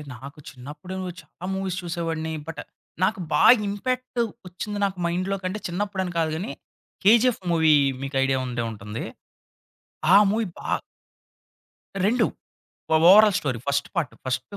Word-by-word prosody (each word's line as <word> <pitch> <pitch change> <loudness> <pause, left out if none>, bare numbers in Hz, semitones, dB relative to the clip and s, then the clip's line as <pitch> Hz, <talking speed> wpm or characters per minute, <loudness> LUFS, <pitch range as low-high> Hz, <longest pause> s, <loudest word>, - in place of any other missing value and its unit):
నాకు 140 +5 -11
చిన్నప్పుడే 145 +8 -9
ఉచ్ 175 - -8
చాలా 180 - -10
మూవీస్ 190 -2 -3
చూసేవాడిని. 165 -2 -3
బట్, 165 - -6 0.4
నాకు 210 +1 +1
బాగా 245 - +8 0.2
ఇంపాక్ట్ 255 +4 -2 0.3
ఒచ్చింది 205 +3 -5
నాకు 190 -1 -3
మైండ్‌లో 185 +3 -1
కంటే, 185 +3 -3
చిన్నప్పుడని 190 0 -3
కాదు 160 -1 +1
గాని, 190 +9 -4 0.5
'కేజీఎఫ్' 235 +1 +5
మూవీ 160 -2 +4 0.3
మీకు 135 0 -3
ఐడియా 135 0 +1
ఉండే 120 -1 -2
ఉంటుంది. 105 +1 -6 1.1
ఆ - - +10
మూవీ 220 +1 0
బా - - -5 1.4
2 240 +4 +3 0.7
ఓ - - +6 0.2
overall 210 0 +7
story. 130 -5 -2
First 140 0 0
part, 165 -7 -1
first 130 0 -1
175 Hz, 135 wpm, -24 LUFS, 145-200 Hz, 1.4 s, ఆ